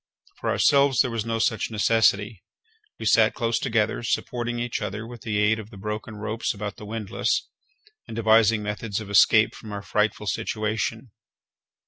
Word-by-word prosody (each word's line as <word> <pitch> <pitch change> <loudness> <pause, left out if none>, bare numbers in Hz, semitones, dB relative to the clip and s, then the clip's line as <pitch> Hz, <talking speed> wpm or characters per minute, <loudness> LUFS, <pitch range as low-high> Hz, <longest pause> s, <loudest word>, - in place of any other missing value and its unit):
For - - -2
ourselves 140 -3 +4
there 125 - 0
was 115 -2 -3
no 115 0 -1
such 115 -1 0
necessity. 110 -2 +2 0.6
We - - -7
sat - - +4
close 115 -1 0
together, 110 -4 0
supporting 120 0 -2
each 120 -1 -3
other 105 +2 -4
with 120 -1 -10
the 105 -1 -2
aid 105 +1 +2
of 110 -1 -9
the 105 - -13
broken 105 +2 -5
ropes 110 +2 -3
about 105 0 -5
the 105 - -10
windlass, 110 -2 -1 0.6
and - - -7
devising 110 -1 +4
methods 105 0 -3
of 105 -2 -8
escape 110 +2 +5
from 110 - -10
our 100 -1 -5
frightful 105 +2 0
situation. 110 +3 -2
110 Hz, 165 wpm, -25 LUFS, 105-115 Hz, 0.6 s, escape